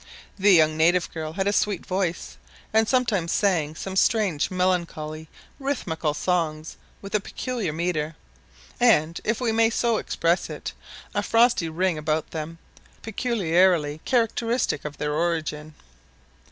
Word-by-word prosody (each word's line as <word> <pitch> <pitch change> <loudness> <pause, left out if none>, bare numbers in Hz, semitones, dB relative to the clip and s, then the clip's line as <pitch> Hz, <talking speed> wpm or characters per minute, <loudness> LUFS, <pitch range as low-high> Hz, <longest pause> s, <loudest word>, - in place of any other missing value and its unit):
The 200 +2 +5
young 155 -3 +5
native 170 +2 +2
girl 155 -1 -5
had 190 +3 -1
a 200 - +1
sweet 205 -2 0
voice, 185 -2 -2 0.4
and 220 0 +4
sometimes 215 -10 +1
sang 165 -7 +1
some 190 +3 -6
strange 195 -7 +2
melancholy 170 -4 -2 0.3
rhythmical 170 - -2
songs 160 -3 -1 0.3
with 195 - -8
a 210 - +3
peculiar 230 -3 -4
metre, 160 -1 -2 0.6
and, 170 -10 +3
if 230 0 0
we 245 -3 0
may 225 0 +3
so 235 -1 +1
express 170 -2 0
it, - - -6 0.4
a - - +1
frosty 230 -7 +3
ring 175 0 0
about 155 0 -1
them, 160 +1 -5 0.5
peculiarly 180 -9 +1
characteristic 230 - 0
of 150 -1 -6
their 150 0 -2
origin. 155 -2 -2
175 Hz, 135 wpm, -24 LUFS, 155-215 Hz, 0.6 s, The